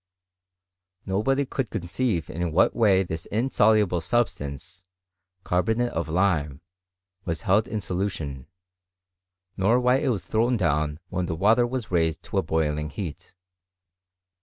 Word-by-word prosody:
Nobody 135 +9 +1
could 130 -3 -3
conceive 90 0 -2
in 85 0 -2
whatwaV 95 +1 +4
this 80 -1 -5
insoluble 105 -6 +2
substance 85 - -2 0.6
(carbonate 110 +7 0
of 80 -1 -3
lime) 80 -5 0 0.6
was 85 -3 -3
heltt 105 +3 +3
in 110 - -3
solution, 90 -9 -3 1.1
nor 110 +6 +3
why 125 +1 +3
it 140 - -1
was 100 -9 -1
thrown 120 +3 +1
down 75 -5 0
when 90 -1 -2
tiie 85 -2 -3
Wei 105 +6 +5
ter 120 +1 +2
was 125 -4 -4
raised 80 -3 +1
to - - -1
a - - +2
boiling 75 -1 -1
heat. 85 +2 -7
95 Hz, 130 wpm, -25 LUFS, 80-110 Hz, 1.1 s, Wei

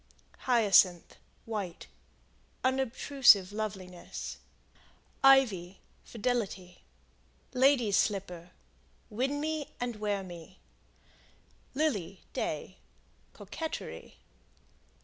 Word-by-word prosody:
Hyacinth, 200 -7 +4 0.3
White 205 -6 -5 0.8
Unobtrusive 260 -5 +4
loveliness. 190 -4 -6 0.9
Ivy 220 -10 +4 0.2
Fidelity. 205 -6 -3 0.7
Lady's 250 -6 +4
Slipper 180 -4 -1 0.6
Win 265 +6 -1
me 310 -1 -3
and 245 -2 -3
wear 205 -2 -2
me. 175 0 -11 1.2
Lily, 210 - -1
Day 170 +5 -4 0.5
Coquetry. 320 -1 -7
210 Hz, 65 wpm, -30 LUFS, 185-260 Hz, 1.2 s, Hyacinth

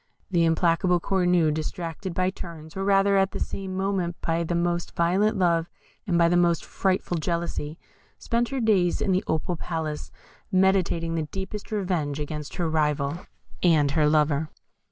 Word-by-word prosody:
The 170 -2 +3
implacable 170 +2 +2
Cornue, 180 -4 +2
distracted 165 +3 -4
by 185 0 +1
turns, 160 -4 -9
or 195 - -2
rather 195 0 +4
at 195 0 +2
the - - -4
same 190 -1 -4
moment, 190 -3 -1
by 165 +1 0
the 170 +1 -2
most 175 0 -1
violent 190 +6 +2
love 170 -2 +2 0.4
and 175 -3 +2
by 170 0 +5
the 175 - +2
most 175 -1 +2
frightful 185 -2 -1
jealousy, 165 -2 -3 0.4
spent 235 0 -1
her 275 - -2
days 200 -7 +2
in 195 - 0
the 185 +2 +2
Opal 160 +2 -1
Palace, 160 -3 -4 0.4
meditating 185 -3 +2
the 160 -2 -2
deepest 195 +2 -6
revenge 175 -8 -1
against 150 0 -5
her 175 - -1
rival 150 0 0 0.3
and 155 -5 +4
her 150 0 +3
lover. 150 0 +2
170 Hz, 160 wpm, -25 LUFS, 160-190 Hz, 0.4 s, by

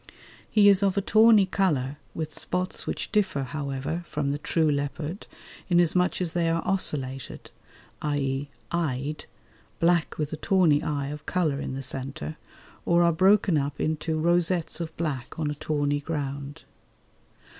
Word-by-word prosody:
He 210 -2 +5
is 200 -1 +6
of 195 -1 +1
a - - +3
tawny 220 0 +6
colour 150 -8 0 0.2
with 155 -1 -4
spots 180 +1 -3
which - - -3
differ, 190 -9 +1
however, 140 +4 -3
from 145 -2 -1
the 145 - -2
true 160 +1 +1
leopard 145 +6 -3 0.4
inasmuch 175 +1 +3
as 170 -3 -1
they 170 -1 +1
are 165 0 0
ocellated, 135 -8 -2 0.5
i.e. 140 -1 -1 0.2
eyed, 150 -3 -2 0.5
black 170 -1 +2
with 150 -1 -2
a - - -3
tawny 165 -4 +3
eye 140 -2 -2
of 150 +1 -8
colour 160 -6 0
in 130 - -4
the 135 - -5
centre, 130 - -5 0.5
or 170 0 +3
are 170 0 +4
broken 190 -1 +4
up 140 0 -3
into 155 +1 -1
rosettes 175 +1 +1
of 160 -1 -6
black 140 -7 -3
on 155 -2 -1
a - - -2
tawny 145 -1 -1
ground. 140 -2 -5
155 Hz, 150 wpm, -26 LUFS, 140-175 Hz, 0.5 s, is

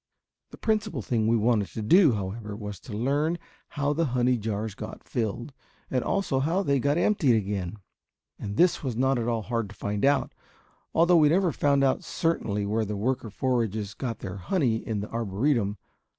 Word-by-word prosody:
The - - -12
principal 215 - -1
thing 110 -1 0
we 115 +1 +4
wanted 110 -2 +2
to 110 - -4
do, 160 - +6
however, 105 +1 -4
was 105 -2 -7
to - - -12
learn 145 +8 +1 0.3
how 145 0 -1
the 165 +2 +1
honey 125 +1 +3
jars 110 -1 -3
got - - -8
filled 120 +4 -3 0.4
and 130 -2 +1
also 195 -9 0
how 165 +8 +1
they 140 -5 +2
got 145 +4 +1
emptied 175 - +3
again! 100 -2 -3 0.6
And 100 +1 -5
this 180 0 +4
was 130 -5 -2
not 130 0 +2
at 115 - -2
all 115 -2 0
hard 115 -2 -2
to 100 - -12
find 100 0 -3
out, 140 +1 +2 0.6
although 170 +1 +5
we 150 -2 +6
never 180 +2 +3
found 140 -1 +2
out 135 +6 +2
certainly 115 -13 -1
where 110 +2 0
the 105 -1 -3
worker 120 +2 -1
foragers 110 -3 -1
got 120 -4 -4
their 95 +1 -6
honey 120 - +1
in 110 -2 -3
the 105 - -6
Arboretum. 115 0 0
120 Hz, 185 wpm, -27 LUFS, 105-145 Hz, 0.6 s, do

